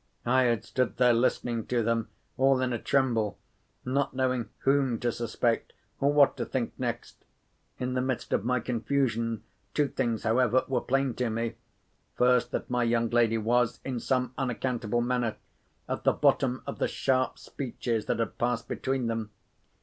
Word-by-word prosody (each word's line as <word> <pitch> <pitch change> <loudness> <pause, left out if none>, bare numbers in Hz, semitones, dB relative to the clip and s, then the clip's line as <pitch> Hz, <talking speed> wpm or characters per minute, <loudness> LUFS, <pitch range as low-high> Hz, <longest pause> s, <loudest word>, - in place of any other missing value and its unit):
I 130 +2 +4
had 115 -3 +1
stood 125 -6 -1
there 125 -1 +5
listening 115 -1 0
to 120 -2 +1
them, 115 0 0 0.3
all 135 0 +4
in 130 -1 0
a 120 - -2
tremble; 115 -8 +1 0.5
not 135 +1 0
knowing 130 -2 0
whom 135 -3 +2
to 120 - +1
suspect, 115 0 -1 0.3
or 140 +1 +3
what 145 -1 +5
to - - -2
think - - -2
next. - - -4 0.5
In 125 0 -2
the 125 - +1
midst 130 -1 -2
of - - +1
my 125 +1 +1
confusion, 115 -2 -1 0.3
two 150 -1 +3
things, 120 -4 -1
however, 125 +2 +3
were 130 -3 0
plain 135 -1 +1
to 125 -2 0
me. 115 +1 -2 0.6
First, 125 0 +3
that - - -3
my 125 0 0
young 115 -1 +1
lady 115 -1 +3
was, 120 +2 +1
in 130 -3 -2
some 125 0 0
unaccountable 120 -3 -1
manner, 120 -2 0 0.5
at - - -3
the - - +4
bottom 130 -1 +2
of 140 - -6
the - - +2
sharp 130 -1 0
speeches 120 -4 -3
that - - +1
had 115 - -3
passed 120 -1 0
between 130 -2 -1
them. 115 -2 -2
125 Hz, 170 wpm, -28 LUFS, 115-130 Hz, 0.6 s, there